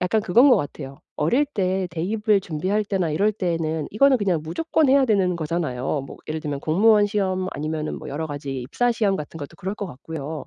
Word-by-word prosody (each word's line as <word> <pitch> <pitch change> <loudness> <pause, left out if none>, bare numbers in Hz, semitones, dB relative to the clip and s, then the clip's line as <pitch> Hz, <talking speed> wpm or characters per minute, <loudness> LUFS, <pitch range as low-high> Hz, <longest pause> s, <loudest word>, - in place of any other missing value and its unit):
약간 180 +5 +1
그건 235 +9 +5
것 255 - +6
같아요. 140 -1 -5 0.2
어릴 240 - +2
때 190 -8 -1
대입을 205 +5 +1
준비할 185 +6 -1
때나 190 -5 -1
이럴 200 +8 +2
때에는 165 -5 -2
이거는 270 +5 +4
그냥 185 -6 +1
무조건 310 - 0
해야 275 +1 +5
되는 195 -6 +2
거잖아요. 150 -4 -2
뭐 - - -10
예를 155 0 -3
들면 145 -2 -4
공무원 205 +7 +4
시험 190 -3 -1
아니면은 155 +1 -3
뭐 - - -9
여러 155 +3 -3
가지 140 -3 -5
입사 240 - 0
시험 205 -4 +1
같은 150 +1 -7
것도 145 +2 -8
그럴 195 +1 -4
것 205 - -5
같고요. 155 +1 -7
180 Hz, 420 characters per minute, -23 LUFS, 155-210 Hz, 0.2 s, 것